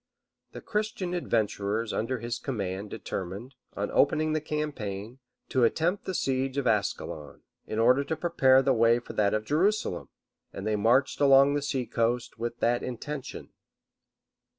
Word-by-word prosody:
The -, -, -8 dB
Christian 210 Hz, -4 st, -2 dB
adventurers 110 Hz, -, -1 dB
under 125 Hz, +4 st, -1 dB
his 120 Hz, 0 st, -4 dB
command 100 Hz, -5 st, -4 dB
determined, 100 Hz, +10 st, -6 dB, 0.2 s
on 100 Hz, +1 st, -3 dB
opening 155 Hz, +2 st, +2 dB
the 155 Hz, -, 0 dB
campaign, 125 Hz, -8 st, -4 dB, 0.3 s
to 130 Hz, -, +2 dB
attempt 170 Hz, -, +1 dB
the 190 Hz, -, -3 dB
siege 135 Hz, -1 st, -1 dB
of 140 Hz, -, 0 dB
Ascalon, 100 Hz, -8 st, -2 dB, 0.2 s
in 110 Hz, -, -4 dB
order 125 Hz, +5 st, +4 dB
to 160 Hz, -, -2 dB
prepare 135 Hz, -5 st, +4 dB
the 135 Hz, -, +3 dB
way 115 Hz, 0 st, +4 dB
for 120 Hz, -, -8 dB
that 105 Hz, 0 st, +2 dB
of 110 Hz, 0 st, -2 dB
Jerusalem; 175 Hz, -, 0 dB, 0.4 s
and 95 Hz, -, -7 dB
they 110 Hz, 0 st, +1 dB
marched 120 Hz, +8 st, +2 dB
along 140 Hz, 0 st, +6 dB
the 145 Hz, -, 0 dB
sea 135 Hz, -3 st, -2 dB
coast 115 Hz, 0 st, -1 dB
with 120 Hz, +1 st, -4 dB
that 120 Hz, +1 st, +2 dB
intention. 130 Hz, +3 st, -6 dB
125 Hz, 150 wpm, -28 LUFS, 110-145 Hz, 0.4 s, along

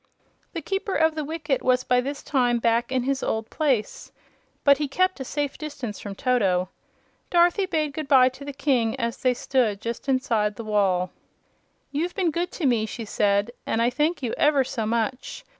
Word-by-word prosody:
The 330 Hz, -3 st, -5 dB
Keeper 390 Hz, +2 st, -2 dB
of 320 Hz, 0 st, +3 dB
the 310 Hz, -1 st, -3 dB
Wicket 305 Hz, -2 st, -2 dB
was 255 Hz, 0 st, +2 dB
by 250 Hz, 0 st, +2 dB
this 280 Hz, +3 st, -5 dB
time 245 Hz, -4 st, +2 dB
back 235 Hz, +1 st, +1 dB
in 260 Hz, -2 st, +1 dB
his 270 Hz, +1 st, -1 dB
old 220 Hz, 0 st, -2 dB
place, 270 Hz, -9 st, -1 dB, 0.5 s
but 280 Hz, -1 st, +5 dB
he 295 Hz, -, 0 dB
kept 370 Hz, +5 st, +1 dB
a -, -, -3 dB
safe 285 Hz, +1 st, -3 dB
distance 275 Hz, -8 st, -6 dB
from 200 Hz, -1 st, -7 dB
Toto. 195 Hz, -8 st, +1 dB, 0.6 s
Dorothy 350 Hz, +3 st, +3 dB
bade 310 Hz, -5 st, -1 dB
good 310 Hz, 0 st, -5 dB
bye 260 Hz, -2 st, +6 dB
to 260 Hz, +2 st, -12 dB
the 285 Hz, -, -5 dB
King 270 Hz, -4 st, 0 dB
as 235 Hz, -1 st, -2 dB
they 255 Hz, -1 st, +1 dB
stood 235 Hz, -6 st, 0 dB
just 235 Hz, +5 st, -5 dB
inside 230 Hz, -6 st, +1 dB
the 230 Hz, -, -7 dB
wall. 195 Hz, -4 st, +1 dB, 0.8 s
"You've 335 Hz, +5 st, -2 dB
been 365 Hz, -4 st, +1 dB
good 345 Hz, +3 st, -1 dB
to 330 Hz, -, -3 dB
me," 230 Hz, -4 st, +2 dB
she 225 Hz, +1 st, -6 dB
said, 205 Hz, +1 st, +1 dB, 0.2 s
"and 225 Hz, -, 0 dB
I 235 Hz, +1 st, +2 dB
thank 295 Hz, +3 st, 0 dB
you 235 Hz, -, -1 dB
ever 290 Hz, -2 st, +4 dB
so 230 Hz, -4 st, -3 dB
much. 235 Hz, +3 st, -2 dB
260 Hz, 190 wpm, -25 LUFS, 230-295 Hz, 0.8 s, bye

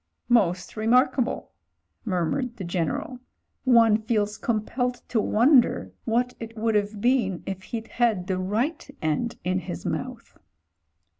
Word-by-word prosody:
"Most 190 Hz, -7 st, +2 dB
remarkable," 250 Hz, +3 st, +2 dB, 0.5 s
murmured 225 Hz, -, -1 dB
the 195 Hz, -, -5 dB
General. 175 Hz, -, -2 dB, 0.5 s
"One 230 Hz, -4 st, +5 dB
feels 215 Hz, -2 st, 0 dB
compelled 235 Hz, +3 st, -1 dB
to 225 Hz, -, +2 dB
wonder 245 Hz, +5 st, +3 dB
what 245 Hz, +2 st, +1 dB
it 225 Hz, 0 st, -8 dB
would 225 Hz, +1 st, +1 dB
have 210 Hz, 0 st, 0 dB
been 240 Hz, -7 st, +1 dB
if 190 Hz, -1 st, -5 dB
he'd 230 Hz, -1 st, -5 dB
had 225 Hz, -7 st, +1 dB
the 185 Hz, 0 st, -1 dB
right 225 Hz, -, -1 dB
end 155 Hz, +10 st, -1 dB
in 185 Hz, +1 st, 0 dB
his 85 Hz, -, -7 dB
mouth." -, -, -5 dB
220 Hz, 130 wpm, -25 LUFS, 190-245 Hz, 0.5 s, One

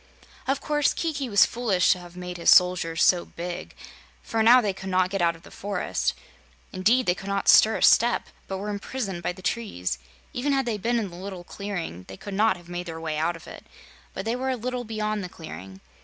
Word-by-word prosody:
Of 270 Hz, +1 st, 0 dB
course, 295 Hz, -1 st, +1 dB
Kiki 285 Hz, -6 st, -2 dB
was 205 Hz, -2 st, +6 dB
foolish 220 Hz, -7 st, +2 dB
to 180 Hz, -, +1 dB
have 175 Hz, 0 st, -12 dB
made 180 Hz, 0 st, -6 dB
his 170 Hz, -, +2 dB
soldiers 180 Hz, -3 st, +5 dB
so 175 Hz, -2 st, +4 dB
big, 175 Hz, +1 st, -7 dB, 0.5 s
for 225 Hz, -, -1 dB
now 235 Hz, +3 st, +8 dB
they 210 Hz, -5 st, 0 dB
could 190 Hz, 0 st, -7 dB
not 185 Hz, 0 st, +2 dB
get 195 Hz, -2 st, -1 dB
out 170 Hz, -1 st, +2 dB
of 165 Hz, -, -17 dB
the -, -, -14 dB
forest. 200 Hz, 0 st, -2 dB, 0.6 s
Indeed, 225 Hz, +7 st, +3 dB
they 175 Hz, -, +3 dB
could 195 Hz, +2 st, -10 dB
not 200 Hz, 0 st, -1 dB
stir 220 Hz, +1 st, +7 dB
a -, -, -2 dB
step, 240 Hz, +1 st, +5 dB, 0.2 s
but 190 Hz, -, -3 dB
were 205 Hz, +2 st, -4 dB
imprisoned 200 Hz, -3 st, -4 dB
by 175 Hz, -, -1 dB
the 185 Hz, +1 st, -14 dB
trees. 90 Hz, -, -2 dB, 0.3 s
Even 280 Hz, +3 st, 0 dB
had 270 Hz, -1 st, +1 dB
they 220 Hz, -3 st, -2 dB
been 235 Hz, +4 st, 0 dB
in 205 Hz, -5 st, -2 dB
the -, -, -10 dB
little 185 Hz, 0 st, -7 dB
clearing 175 Hz, -, -6 dB
they 95 Hz, -, -9 dB
could 205 Hz, -, -8 dB
not 210 Hz, -1 st, +3 dB
have 175 Hz, -1 st, -16 dB
made 175 Hz, 0 st, -5 dB
their 165 Hz, -1 st, -6 dB
way 155 Hz, -2 st, -3 dB
out 170 Hz, +2 st, 0 dB
of 165 Hz, -, -12 dB
it, -, -, -11 dB, 0.5 s
but 190 Hz, -, -4 dB
they 230 Hz, +2 st, 0 dB
were 260 Hz, +1 st, -2 dB
a 260 Hz, -, +1 dB
little 250 Hz, +1 st, -4 dB
beyond 215 Hz, -1 st, -2 dB
the 180 Hz, -, -6 dB
clearing. 95 Hz, -, -10 dB
195 Hz, 230 wpm, -25 LUFS, 175-230 Hz, 0.6 s, now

